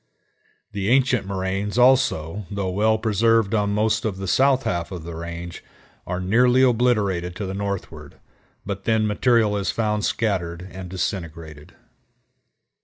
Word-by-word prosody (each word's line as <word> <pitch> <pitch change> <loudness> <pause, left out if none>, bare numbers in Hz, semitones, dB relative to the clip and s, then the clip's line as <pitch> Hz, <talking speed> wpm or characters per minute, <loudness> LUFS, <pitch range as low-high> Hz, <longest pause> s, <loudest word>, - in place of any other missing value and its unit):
The 100 0 -2
ancient 125 -4 +2
moraines 95 +2 -2
also, 120 -8 +2
though 100 -2 -3
well 110 +3 +2
preserved 110 -1 +2
on 105 -2 +1
most 110 +1 +1
of 105 -4 -2
the 95 0 -5
south 135 +5 +3
half 85 0 -2
of 90 -4 -6
the 85 +1 -7
range, 85 +1 -7 0.4
are 90 0 -2
nearly 125 +7 +3
obliterated 105 -8 +1
to 100 - -4
the 95 - -4
northward, 95 -7 -5 0.5
but 100 -1 -5
then 110 -1 +2
material 110 0 +2
is 100 -1 -1
found 105 -2 -1
scattered 90 -7 -2
and 90 0 -8
disintegrated. 85 -5 -5
100 Hz, 140 wpm, -23 LUFS, 90-110 Hz, 0.5 s, south